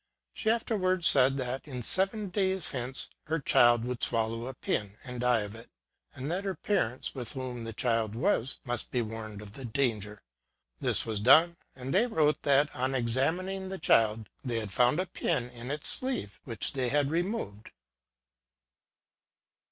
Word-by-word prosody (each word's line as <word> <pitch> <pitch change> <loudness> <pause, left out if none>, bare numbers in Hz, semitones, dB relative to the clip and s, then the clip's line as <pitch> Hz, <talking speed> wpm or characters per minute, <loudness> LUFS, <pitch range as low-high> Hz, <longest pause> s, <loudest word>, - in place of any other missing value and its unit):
She 220 - -1
afterwards 185 -6 +2
said 135 0 +5
that, 130 +2 -3
in 125 -4 -5
seven 195 - 0
days 190 -3 0
hence, 130 0 -4 0.2
her 160 +2 -1
child 120 -3 +4
would 125 -1 -4
swallow 115 +1 0
a 130 - -6
pin, 105 -3 -2
and 125 -2 -6
die 125 -2 +3
of 105 0 -6
it; 115 +1 -12 0.5
and 135 +4 -4
that 185 +3 -2
her 195 -2 -2
parents, 130 - -1
with 125 -1 -4
whom 125 -3 -5
the 115 - -5
child 115 -1 0
was, 135 - 0
must 120 -2 -2
be 125 -2 0
warned 110 -2 -7
of 100 - -11
the 135 - -9
danger. 110 -4 -2 0.6
This - - +2
was 110 -2 -2
done; 160 +10 +6 0.2
and 130 +1 -5
they 220 +6 +4
wrote 150 - +2
that, 145 +1 +3
on 130 +2 -1
examining 165 +11 -1
the 190 - -4
child, 110 - +3 0.2
they 120 -4 -1
had 105 -3 -5
found 125 - +3
a 185 - +1
pin 150 -8 -2
in 120 +1 -8
its 145 +1 0
sleeve, 255 - +1
which 115 -5 -1
they 130 -3 0
had 145 +1 +1
re 165 +2 +2
moved. 110 - -5
130 Hz, 175 wpm, -30 LUFS, 115-165 Hz, 0.6 s, done